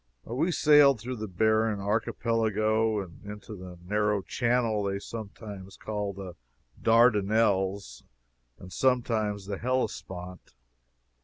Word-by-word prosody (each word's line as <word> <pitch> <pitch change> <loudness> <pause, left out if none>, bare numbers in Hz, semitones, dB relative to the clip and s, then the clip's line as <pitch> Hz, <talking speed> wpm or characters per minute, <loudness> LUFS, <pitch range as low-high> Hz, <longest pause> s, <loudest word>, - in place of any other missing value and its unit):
We 145 +10 0
sailed 145 -5 +6
through 125 +3 -5
the 110 0 -5
barren 110 +2 +1
Archipelago, 110 0 0
and 85 -2 -11
into 105 +1 -8
the 90 -2 -10
narrow 105 0 0
channel 115 -2 0
they 100 -1 -1
sometimes 100 -2 -8
call 105 -2 -3
the 95 -2 -8 0.5
Dardanelles 100 - +2 0.6
and 90 0 -11
sometimes 110 -6 0
the 100 -1 -5
Hellespont. 90 - -4
105 Hz, 105 wpm, -28 LUFS, 100-115 Hz, 0.6 s, sailed